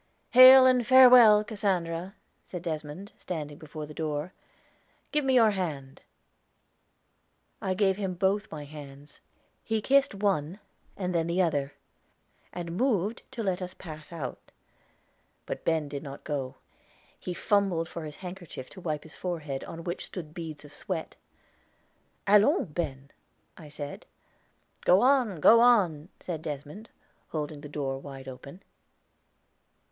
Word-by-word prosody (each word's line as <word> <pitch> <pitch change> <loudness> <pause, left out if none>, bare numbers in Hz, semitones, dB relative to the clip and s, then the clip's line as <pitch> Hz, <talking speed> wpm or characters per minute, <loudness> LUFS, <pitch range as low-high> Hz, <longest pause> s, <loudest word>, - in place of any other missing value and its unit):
"Hail, 255 +1 +10
and 250 -3 +3
farewell, 245 -5 +8
Cassandra!" 190 -4 -2 0.3
said 180 -2 -8
Desmond, 160 +4 -5
standing 150 -4 -6
before 155 0 -8
the 150 - -11
door. 155 +2 -3 0.8
"Give 300 0 +1
me 265 -1 +2
your 225 -3 +6
hand." 150 -9 -5 1.6
I 185 -1 -1
gave 195 -1 +2
him 190 -3 -3
both 195 +4 0
my 150 -2 -7
hands. 145 -1 -12 0.4
He 220 -1 -1
kissed 270 0 +2
one, 195 -3 -1 0.4
and 180 -2 -2
then 165 -1 0
the 170 +2 -1
other, 145 -6 0 0.8
and 170 -1 -6
moved 225 -3 0
to 235 -3 -4
let 190 -2 -1
us 180 0 -6
pass 155 -3 -9
out. 150 -7 -7 0.9
But - - -6
Ben 160 -2 0
did 140 -1 -6
not 140 -2 -9
go; 135 -3 -4 0.6
he 180 - -5
fumbled 195 -6 +1
for 165 0 -7
his 150 -1 -8
handkerchief 175 -8 -9
to 185 - -11
wipe 155 -4 -3
his 160 - -14
forehead, 155 -7 -4
on 165 0 -8
which 175 +1 -4
stood 160 -5 -8
beads 160 -3 -7
of 145 - -14
sweat. 170 -4 -5 1.1
"Allons, 210 - +4
Ben," 140 -4 -5 0.4
I 155 -3 -12
said. 145 -1 -8 0.8
"Go 185 +2 +5
on, 250 - +3
go 230 +9 +7
on," 190 -10 +3
said 165 -4 -5
Desmond, 150 +8 -7 0.4
holding 150 -1 -5
the 150 - -9
door 135 -2 -3
wide 135 -1 -10
open. 140 +7 -10
170 Hz, 140 wpm, -28 LUFS, 150-200 Hz, 1.6 s, Hail